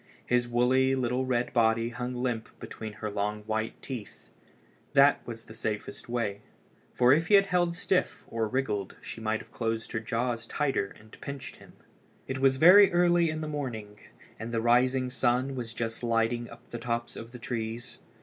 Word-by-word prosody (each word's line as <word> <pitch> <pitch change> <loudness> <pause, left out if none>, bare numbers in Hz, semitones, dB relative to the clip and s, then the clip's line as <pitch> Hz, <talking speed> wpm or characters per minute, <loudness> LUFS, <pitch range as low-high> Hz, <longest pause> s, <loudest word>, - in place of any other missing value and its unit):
His 125 0 +2
woolly 130 +2 +3
little 130 0 0
red 125 -1 0
body 115 0 +3
hung 125 +2 -4
limp 125 -3 -2
between 110 -1 -7
her 105 0 -5
long 105 +1 -2
white 110 +1 -2
teeth. 120 -7 -8 0.6
That 140 0 +6
was 115 -1 -6
the 110 - -12
safest 110 0 -4
way; 110 -4 -2 0.5
for 125 +1 +5
if 160 +3 +2
he 205 - +6
had 195 0 +6
held 175 -2 +1
stiff 185 0 0
or 115 -1 -1
wriggled 105 -6 -2
she 115 - -8
might 110 0 -1
have 115 - -17
closed 115 -1 -3
her 110 - -1
jaws 115 +1 -2
tighter 135 -10 -1
and 110 0 -17
pinched 140 -1 -7
him. - - -16 0.5
It 130 0 -3
was 135 0 +4
very 185 +7 +8
early 175 -1 +4
in 155 0 -3
the 155 - -3
morning, 115 -9 -5 0.4
and 115 +2 -5
the 115 - 0
rising 125 +2 +3
sun 130 +2 +1
was 120 -3 -5
just 115 -1 -3
lighting 115 0 0
up 115 +1 -14
the 120 - -5
tops 120 0 -3
of 115 +1 -8
the 125 - -9
trees. 120 0 -5
120 Hz, 180 wpm, -29 LUFS, 115-130 Hz, 0.6 s, very